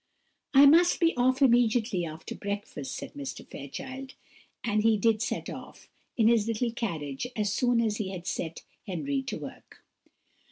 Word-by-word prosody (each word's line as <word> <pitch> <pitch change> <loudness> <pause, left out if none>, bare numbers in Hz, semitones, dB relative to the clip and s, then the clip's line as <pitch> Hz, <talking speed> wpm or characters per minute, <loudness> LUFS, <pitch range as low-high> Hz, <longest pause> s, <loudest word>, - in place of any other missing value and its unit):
"I 275 +1 +9
must 335 +5 +6
be 335 -1 +3
off 260 +2 +3
immediately 230 -7 +3
after 155 +1 -7
breakfast," 200 -8 -5
said - - -7
Mr. 285 -2 -7
Fairchild; 265 +1 -8 0.5
and 215 -2 +1
he 220 0 +4
did 220 +1 +2
set 240 - -2
off, - - -9 0.3
in 225 -2 +4
his 230 -2 +4
little 230 +1 0
carriage, 160 - -3
as 210 -2 0
soon 245 0 +2
as 220 -2 +1
he 205 -4 -3
had 180 -2 -7
set 165 -3 -4 0.2
Henry 270 +10 -1
to 270 - -5
work. - - -11
230 Hz, 160 wpm, -28 LUFS, 200-260 Hz, 0.5 s, I